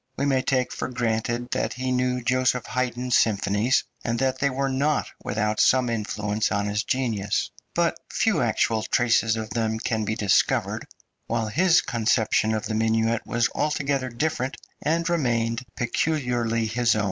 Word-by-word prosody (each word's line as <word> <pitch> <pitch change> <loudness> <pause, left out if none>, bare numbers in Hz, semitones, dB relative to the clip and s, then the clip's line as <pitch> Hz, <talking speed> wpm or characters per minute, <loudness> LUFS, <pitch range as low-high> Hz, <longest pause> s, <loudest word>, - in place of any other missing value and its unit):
We - - 0
may 135 -2 +2
take 130 -1 0
for - - -3
granted 120 0 -2
that - - -1
he 130 +1 -3
knew 125 0 0
Josef 130 -1 +1
Haydn's 125 0 -1
symphonies, 105 +3 +2 0.2
and 115 0 -1
that 130 +1 0
they 140 - +2
were 135 +1 -1
not 140 +3 0
without 105 +1 -1
some 125 -2 +4
influence 105 -1 -1
on 100 0 0
his 105 +1 -1
genius; 110 -6 -1 0.2
but - - +1
few - - +1
actual 110 -1 +1
traces 115 -1 +2
of 110 -1 -5
them 110 -1 -1
can 110 -1 -1
be 110 +1 -1
discovered, 105 -4 +1 0.4
while 115 -1 -1
his 175 - +4
conception 110 -2 +1
of 110 - -3
the 110 - -3
minuet 115 +1 +1
was 120 0 +2
altogether 140 -3 -1
different, 130 +1 -2 0.2
and 165 +2 0
remained 120 -7 0
peculiarly 120 -3 0
his 115 +1 +2
own. - - 0
120 Hz, 160 wpm, -25 LUFS, 110-130 Hz, 0.4 s, some